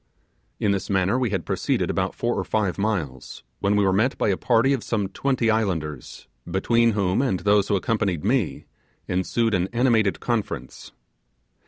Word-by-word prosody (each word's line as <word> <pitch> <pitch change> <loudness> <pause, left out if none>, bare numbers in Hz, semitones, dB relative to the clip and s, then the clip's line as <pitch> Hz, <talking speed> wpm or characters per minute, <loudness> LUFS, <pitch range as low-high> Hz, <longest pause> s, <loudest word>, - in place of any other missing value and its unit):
In 100 - +1
this 100 -1 -2
manner 95 +5 +1
we 125 -3 0
had 95 -4 -2
proceeded - - 0
about - - -2
four - - -1
or - - -2
five 100 -5 -1
miles, 85 - -3 0.2
when 100 +1 +1
we 105 -1 +3
were 95 - +2
met 110 +7 +1
by - - +1
a 95 - +2
party 120 +5 +2
of 130 - -2
some 105 -4 -1
twenty 120 +1 0
islanders, 80 - -3 0.2
between 115 +5 +2
whom 95 +1 +1
and 110 -10 0
those 100 +1 +3
who 100 - +1
accompanied 100 -4 -1
me 115 - 0 0.4
ensued 110 +5 0
an 90 -1 +1
animated 115 -4 +2
conference. 115 -4 -4
105 Hz, 170 wpm, -24 LUFS, 95-115 Hz, 0.4 s, we